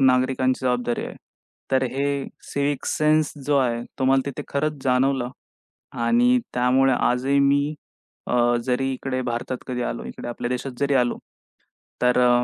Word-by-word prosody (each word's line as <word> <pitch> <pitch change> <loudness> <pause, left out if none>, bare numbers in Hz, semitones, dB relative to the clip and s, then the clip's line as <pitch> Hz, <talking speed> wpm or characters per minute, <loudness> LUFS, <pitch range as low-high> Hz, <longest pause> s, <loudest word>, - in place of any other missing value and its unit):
नागरिकांची 130 0 +2
जबाबदारी 125 -1 0
आहे. - - -9 0.5
तर 130 -1 +3
हे 140 +1 0 0.5
सिव्हिक 140 -1 -1
सेन्स 155 0 +2
जो 145 -1 +3
आहे, 120 -3 0 0.2
तो 130 - 0
मला 135 0 +4
तिथे 140 +1 -4
खरंच 145 0 -2
जाणवलं 130 0 +2 0.8
आणि 245 - +4
त्यामुळे 130 +2 +3
आजही 130 +3 +2
मी 140 +2 +2 0.5
अ, 120 0 +3
जरी 135 +1 0
इकडे 130 0 -3
भारतात 120 +2 -3
कधी 125 -1 -3
आलो, 120 - -3
इकडे - - -7
आपल्या 120 0 -4
देशात 125 +2 -3
जरी 140 0 +1
आलो, 125 -2 +2 0.8
तर 125 0 +3
अ, 125 0 +4
130 Hz, 150 wpm, -23 LUFS, 125-140 Hz, 0.8 s, मला